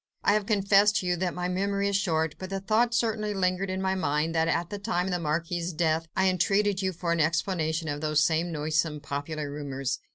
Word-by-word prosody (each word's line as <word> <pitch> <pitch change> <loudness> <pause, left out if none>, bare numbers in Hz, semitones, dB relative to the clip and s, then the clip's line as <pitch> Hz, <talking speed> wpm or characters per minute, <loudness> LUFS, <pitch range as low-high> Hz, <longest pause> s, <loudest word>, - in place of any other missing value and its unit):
I - - +4
have 210 -1 0
confessed 205 0 +4
to 185 - 0
you 180 0 +1
that 180 -1 -2
my 180 0 -2
memory 200 +2 0
is 200 - 0
short, 160 -6 +1
but 185 - -6
the 195 0 -2
thought 225 +4 +1
certainly 215 -3 0
lingered 185 0 0
in 190 +1 -2
my 190 0 +1
mind 155 -3 0
that, 160 0 +2
at 170 +1 -1
the 205 - -4
time 180 -2 -1
of 190 - -2
the 180 - 0
Marquis' 170 +2 -2
death, 160 0 +1
I 190 0 +4
entreated 195 +2 +2
you 190 -1 0
for 170 -1 -3
an 170 - +1
explanation 160 0 0
of 145 -1 -3
those 155 -1 +2
same 165 +1 +1
noisome 155 0 -1
popular 145 +1 -4
rumours. 140 -2 -3
175 Hz, 225 wpm, -27 LUFS, 160-195 Hz, -, I